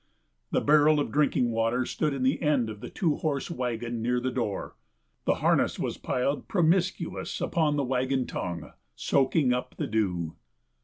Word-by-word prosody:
The - - +1
barrel 150 +1 +5
of 145 - -1
drinking 140 -5 +2
water 115 +3 +1
stood 155 +3 -1
in 135 -2 -2
the 130 +2 +1
end 140 -8 +2
of 105 - -9
the - - -7
two 160 -5 0
horse 145 0 -2
wagon 120 -4 -3
near 125 +2 +1
the 130 +1 -2
door. 115 -6 -3 0.5
The - - +3
harness - - +3
was - - -3
piled, 140 +3 -1
promiscuous, 175 -1 0
upon 155 -3 +1
the 145 - +1
wagon 130 0 0
tongue, 85 -3 -5 0.2
soaking 135 - +2
up 125 0 -3
the - - -1
dew. 90 -7 -1
130 Hz, 165 wpm, -28 LUFS, 115-150 Hz, 0.5 s, barrel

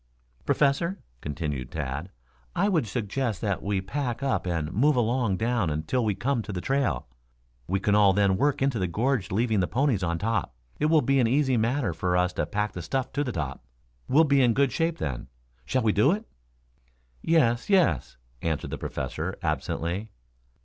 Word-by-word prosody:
"Professor," 160 +7 +2 0.2
continued 75 -3 -4
Tad, 75 +3 -4 0.5
"I 200 +4 +2
would 160 - +1
suggest 110 0 -2
that 100 -4 -1
we 100 -1 -1
pack 120 +4 -3
up 135 -8 0
and 80 -3 -2
move 145 +8 +3
along 120 -4 +1
down 115 -4 0
until 80 +12 -1
we 105 -3 0
come 120 +5 0
to 105 - -6
the 95 - -3
trail. 130 - 0 0.6
We 95 +2 0
can 100 +1 +1
all 105 -2 +6
then 100 -1 +3
work 140 +6 +1
into 135 -5 +1
the 90 - 0
gorge 115 +4 0
leaving 110 +1 +1
the 90 - +1
ponies 130 -6 +1
on 85 -2 0
top. 110 - -1 0.2
It 150 - +2
will 155 -1 +4
be 135 0 +3
an 120 - +4
easy 130 +1 +2
matter 115 - +1
for 90 +2 0
us 90 0 +1
to - - -1
pack 105 +1 -1
the 90 - -6
stuff 130 +8 -2
to 145 - 0
the 125 - -3
top. 70 - -4 0.4
We'll 155 +4 +5
be 140 -3 +3
in 120 -2 +4
good 140 -2 +3
shape 165 +4 0
then. 65 -4 -4 0.4
Shall 130 - 0
we 110 - +3
do 105 +9 +4
it?" 215 +3 -4 1.0
"Yes, 125 - +2
yes," 170 - +2 0.2
answered 80 -4 -2
the - - -4
Professor 85 +5 -4
absently. 85 +6 -2
110 Hz, 185 wpm, -27 LUFS, 90-135 Hz, 1.0 s, all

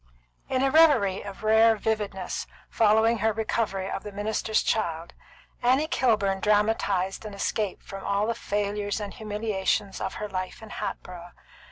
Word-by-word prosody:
In 260 0 +1
a 270 - +2
reverie 265 -12 +5
of 200 +1 -9
rare 220 +1 +5
vividness 210 -3 -3 0.2
following 220 +1 +3
her 220 - +2
recovery 215 -3 -1
of 195 - -4
the 210 - -8
minister's 215 +2 0
child, 170 -6 -1 0.5
Annie 260 +5 +3
Kilburn 215 - +1
dramatised 205 -2 +1
an 210 -2 -7
escape 200 0 -2
from 195 0 -8
all 200 +1 +1
the 230 - 0
failures 205 -1 -2
and 205 -2 -5
humiliations 210 -2 -2
of 190 - -3
her 210 - -4
life 185 +2 -5
in 220 - -10
Hatboro'. 175 -1 -6
210 Hz, 150 wpm, -26 LUFS, 195-220 Hz, 0.5 s, reverie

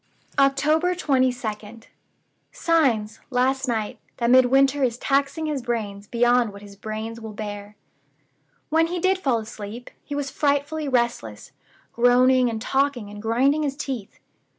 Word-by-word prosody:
"October 305 +6 +3
22d. 245 -7 -1 0.7
Signs, 245 -11 +1
last 265 +1 +1
night, 220 -3 -2 0.2
that 235 0 +1
Midwinter 270 +2 +5
is 240 -2 +1
taxing 280 +4 0
his 295 -3 -2
brains 210 -4 -4
beyond 240 -1 +2
what 200 +1 -12
his 200 -1 -12
brains 220 +2 -6
will 220 -1 -7
bear. 205 0 -7 0.9
When 325 +1 +3
he 355 +2 -3
did 375 +2 +1
fall 265 -9 +1
asleep, 220 +1 -8
he 290 - -6
was 285 -1 -3
frightfully 290 +1 0
restless; 235 - -1 0.4
groaning 250 +1 +4
and 225 -1 -3
talking 265 -3 -1
and 205 0 -9
grinding 260 +7 +2
his 280 -2 -2
teeth. 255 -9 -5
250 Hz, 135 wpm, -23 LUFS, 220-280 Hz, 0.9 s, Midwinter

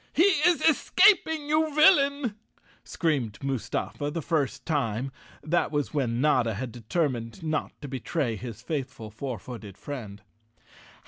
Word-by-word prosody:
"He 365 +6 +5 0.2
is 350 -2 +2
escaping, 320 -1 +4
you 310 0 +1
villain!" 285 - +5 0.5
screamed 135 - -1
Mustafa 135 +2 -2
the 165 +1 -4
first 150 -5 -1
time—that 135 +4 -2
was 145 -1 -1
when 120 -5 0
Notta 125 -6 +2
had 120 +3 -4
determined 120 - -2
not 155 -1 -2
to - - -4
betray 130 -1 -2
his 115 +1 -8
faithful 125 -7 -4
four 125 +3 -5
footed 105 -2 -9
friend. 110 -8 -7
140 Hz, 125 wpm, -27 LUFS, 115-175 Hz, 0.5 s, He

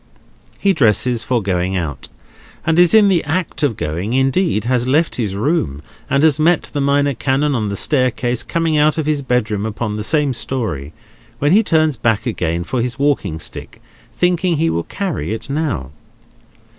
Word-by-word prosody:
He 200 -1 +2
dresses 120 - +2
for 120 -3 0
going 95 -1 -1
out, 75 -7 -4 0.6
and 165 +1 +2
is 180 +4 +5
in 215 -2 +6
the 185 -4 +2
act 165 +2 -2
of 140 -8 0
going—indeed 125 - 0
has 125 0 0
left 155 +5 +1
his 105 -6 -2
room, 100 - -1 0.3
and 140 +1 +2
has 155 -2 +4
met 165 +1 +2
the 145 - -1
Minor 140 0 +2
Canon 135 +4 0
on 110 -5 -1
the 100 - -3
staircase, 125 -1 0
coming 165 -2 0
out 150 +1 +3
of 160 - -1
his 150 -2 0
bedroom 110 -6 -1
upon 110 -1 -3
the 105 - -3
same 145 +2 +1
story—when 115 - -4
he 205 +4 +6
turns 155 - +1
back 110 -2 0
again 85 -7 -2
for 120 +6 -2
his 125 +2 -3
walking 140 - 0
stick, 80 - -8 0.3
thinking 180 -1 +1
he 165 +2 +1
will 85 - -2
carry 185 - -3
it 115 - -7
now. 140 - -2
130 Hz, 170 wpm, -18 LUFS, 105-155 Hz, 0.6 s, in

